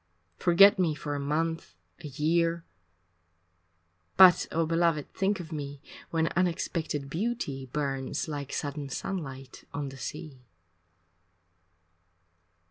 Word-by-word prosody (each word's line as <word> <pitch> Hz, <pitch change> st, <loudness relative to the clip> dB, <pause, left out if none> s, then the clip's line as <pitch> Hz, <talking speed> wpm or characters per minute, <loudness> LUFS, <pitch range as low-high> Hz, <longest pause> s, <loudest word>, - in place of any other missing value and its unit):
Forget 190 Hz, +3 st, +6 dB
me 165 Hz, -4 st, +2 dB
for 145 Hz, 0 st, -4 dB
a 145 Hz, -, -2 dB
month, 155 Hz, -, -2 dB, 0.2 s
a -, -, -8 dB
year, 165 Hz, +4 st, 0 dB, 1.5 s
But, 185 Hz, -2 st, +8 dB
oh, 165 Hz, 0 st, +1 dB
beloved, 165 Hz, -2 st, +1 dB
think 195 Hz, 0 st, 0 dB
of 170 Hz, -2 st, -8 dB
me 145 Hz, -2 st, -5 dB, 0.3 s
When 165 Hz, -1 st, +1 dB
unexpected 165 Hz, -4 st, -1 dB
beauty 160 Hz, -, -3 dB
burns 135 Hz, 0 st, -2 dB
Like 145 Hz, -3 st, -5 dB
sudden 145 Hz, -1 st, -4 dB
sunlight 135 Hz, -5 st, -6 dB
on 145 Hz, -1 st, -3 dB
the 135 Hz, -, -11 dB
sea. 150 Hz, -1 st, -7 dB
155 Hz, 110 wpm, -28 LUFS, 140-170 Hz, 1.5 s, But